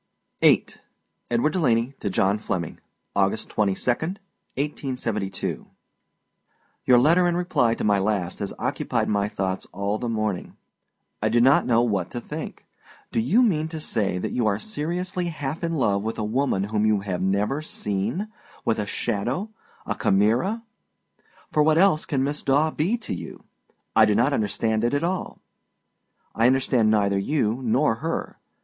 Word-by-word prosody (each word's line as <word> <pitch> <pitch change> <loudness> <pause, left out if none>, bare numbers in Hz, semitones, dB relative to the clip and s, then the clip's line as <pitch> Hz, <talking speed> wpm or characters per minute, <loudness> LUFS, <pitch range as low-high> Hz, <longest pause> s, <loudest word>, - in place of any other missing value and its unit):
VIII. - - +5 0.6
EDWARD 120 +6 +1
DELANEY 125 -7 +1
TO 100 - -2
JOHN 95 +2 +1
FLEMMING. 85 -5 -3 0.4
August 100 +2 0
22, 105 +3 +1
1872. 135 - -4 1.2
Your 125 -1 +6
letter 170 +8 +5
in 175 0 +1
reply 175 -10 +2
to - - -5
my 105 -1 +3
last 95 -3 -1
has 100 - -3
occupied - - -1
my 100 -1 +1
thoughts 95 -2 -3
all 100 +3 -2
the 120 - -3
morning. 110 -4 -2 0.6
I 110 - +2
do 120 +2 +3
not 130 +3 +5
know 120 -1 +4
what 100 -7 0
to 120 - -5
think. 150 +6 -7 0.5
Do - - 0
you 190 - +4
mean 160 -9 +2
to 160 0 -6
say 100 -10 -1
that - - -3
you 120 -3 +1
are 100 -1 +2
seriously 180 - -3
half 155 -2 -4
in 165 -1 -1
love 100 -8 +1
with 110 +2 -3
a 110 - -2
woman 110 -2 0
whom 105 -1 +2
you 110 -2 +3
have 95 -3 -3
never 100 +9 0
seen 115 - -2 0.4
with 110 - +1
a 105 - -2
shadow, 120 - -2 0.3
a - - -1
chimera? 120 - +2 0.9
for 150 - +3
what 155 +1 +4
else 185 -3 +4
can 135 -3 0
Miss 145 +2 -2
Daw 145 +3 +2
to - - -18
be 195 +11 +1
you? 90 - -6 0.5
I 110 - +7
do 105 -1 +2
not 125 +6 +3
understand 110 0 0
it 120 +4 +1
at 145 - 0
all. 180 +2 -2 1.0
I 115 +1 +3
understand 125 -3 +3
neither 100 -2 +2
you 115 +1 0
nor 120 0 +2
her. 165 +6 -4
120 Hz, 160 wpm, -24 LUFS, 105-155 Hz, 1.2 s, I